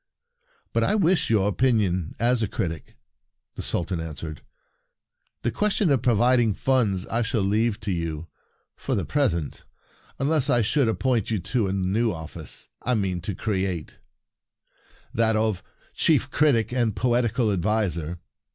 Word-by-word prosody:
" - - -40
But - - +2
I - - +2
wish 185 -3 +2
your 105 -3 +3
opinion 100 -6 +1
as 120 +1 +2
a 110 - +1
critic," 80 -4 -4 0.6
the - - -6
Sultan 90 0 -2
answered. 80 -1 -6 1.0
"The 120 - +1
question 210 - +1
of 135 -4 +3
providing 120 -2 +3
funds 110 -8 +1
I 115 - -1
shall 110 -2 0
leave 105 +2 +1
to 100 - -2
you, 85 -2 -3 0.5
for - - -2
the - - -1
present, 105 - -1 0.5
unless 145 0 +1
I 120 -3 +4
should 130 +2 +2
ap 110 - -1
point 125 -5 0
you 110 - 0
to 105 +4 -1
the 95 - -1
new 100 +4 +1
office 80 -3 -4
I 125 - 0
mean 95 -4 -1
to 100 +2 -4
create— 95 -6 -3 1.1
that 110 0 +2
of 110 -4 0 0.3
Chief 145 -4 +2
Critic 120 -7 +2
and 120 -5 +1
Poetical 120 0 +1
Adviser." 90 -4 -1
110 Hz, 150 wpm, -25 LUFS, 95-125 Hz, 1.1 s, I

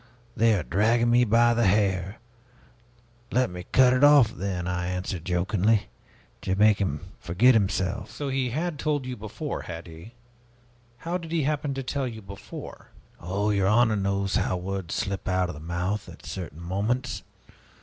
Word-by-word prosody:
They 115 -1 +4
are 90 - -1
dragging 115 +8 +2
me 120 +1 +5
by 120 +2 +4
the 115 -2 +2
hair!' 95 0 +1 1.1
'Let 125 -4 +2
me 90 0 -8
cut 130 -1 +6
it 130 +2 +2
off, 145 -6 +7
then!' 90 -2 -3
I 90 -1 -2
answered 90 -2 -3
jokingly, 100 +4 +1 0.5
to 95 - -1
make 105 0 +4
him 75 -7 -1 0.2
forget 100 +9 +4
himself." 100 -1 0
"So, 145 -2 -5
he 130 -1 0
had 155 +4 -3
told 145 -3 -1
you 125 -1 -4
before, 110 -1 -5
had 80 0 -7
he? 85 +8 -12 0.8
How 175 +6 -3
did 165 -2 -9
he 165 -3 +1
happen 145 -1 -1
to 135 - -3
tell 135 +1 -2
you 110 -3 -8
before?" 100 0 -10 0.3
"Oh, 100 +5 -1
your 100 -2 +2
honor 110 +1 +4
knows 100 -1 0
how 90 - 0
words 95 -1 -4
slip 95 0 -3
out 95 -1 +1
of - - -4
the 75 - -10
mouth 90 +5 -3
at 85 - -13
certain 85 -3 -7
moments. 110 +8 -1
100 Hz, 170 wpm, -26 LUFS, 90-120 Hz, 1.1 s, off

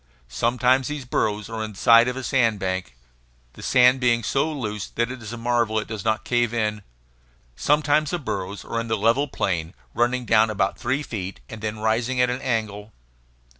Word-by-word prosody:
Sometimes 125 - +2
these 150 -3 -5
burrows 105 -4 -1
are 110 -1 -4
in 110 -1 -6
the - - -15
side 115 +3 +6
of 125 +1 -2
a 130 - -5
sand 115 -4 +2
bank, 95 -7 -3 0.6
the - - -12
sand 125 +1 +4
being 120 -2 +2
so 140 +7 0
loose 105 -8 -4
that 120 +1 -2
it 130 -1 -8
is 110 -1 -7
a 120 - -6
marvel 115 -1 0
that 110 - +1
it - - -19
does 110 -4 -5
not 110 0 0
cave 120 -1 +1
in. 105 -2 -1 0.7
Sometimes 150 - +2
the 175 - -1
burrows 100 - -5
are 115 - -2
in 115 - -4
the 110 -1 0
level 115 +7 +2
plain, 85 - -2 0.2
running 125 +1 0
down 110 0 +4
about 100 -2 0
three 130 +4 -1
feet, 100 -7 -6
and 110 -1 -8
then 110 0 -3
rising 115 +4 0
at 125 0 +3
an 125 +1 -4
angle. 110 -4 -3
115 Hz, 205 wpm, -23 LUFS, 105-125 Hz, 0.7 s, side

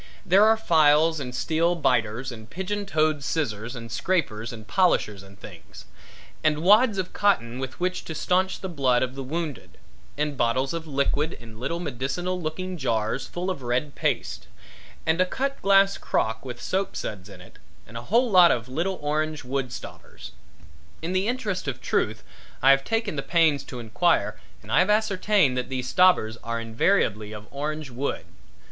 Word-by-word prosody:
There 195 +4 +6
are 220 0 +5
files 160 -5 +4
and 125 -3 -5
steel 165 +4 +1
biters 125 -4 0
and 110 -2 -11
pigeon 200 +5 -4
toed 155 -4 +1
scissors 120 -7 -2
and 115 -1 -8
scrapers 125 -5 -1
and 110 -2 -10
polishers 110 - +1
and 100 0 -16
things; 90 -7 -12 0.6
and 155 0 +1
wads 210 +3 +5
of 185 -1 -3
cotton 125 - +1
with 130 -1 -6
which 185 +1 -1
to 160 - -6
staunch 185 +3 0
the 190 - -4
blood 135 -8 +2
of 130 0 -3
the 135 - -6
wounded, 140 - -5 0.4
and 150 -1 -1
bottles 130 +4 0
of 165 -1 -5
liquid 145 +2 0
and 115 -2 -13
little 150 +7 -3
medicinal 175 +5 -3
looking 180 +3 -4
jars 115 -1 -1
full 180 +2 -3
of 160 - -6
red 125 +4 -1
paste; - - -2 0.6
and 160 +3 +2
a - - +4
cut 275 +7 -3
glass 195 0 +4
crock 110 0 -1
with 125 -2 -7
soap 195 +1 -2
suds 100 -2 -5
in 95 -2 -12
it 90 - -16 0.3
and 115 - -15
a 115 - -4
whole 230 - +2
lot 180 -3 +8
of 120 -4 0
little 170 +8 -2
orange 155 0 -1
wood 130 -1 -3
stobbers. - - -10 0.7
In 170 +3 -2
the 190 +2 +1
interest 225 -9 -2
of 135 - -3
truth - - -1 0.4
I 135 - +8
have 135 0 +4
taken 225 -5 -1
the - - 0
pains 160 -3 +2
to 125 - -8
enquire 110 -1 +1 0.2
and 105 - -10
I - - +4
have 185 +3 +3
ascertained 205 -8 +2
that 125 - -2
these 130 -1 -3
stobbers 180 -12 +4
are 115 0 -3
invariably 110 - 0
of 105 0 -9
orange 150 0 -4
wood. 130 +4 -3
150 Hz, 180 wpm, -25 LUFS, 120-180 Hz, 0.7 s, lot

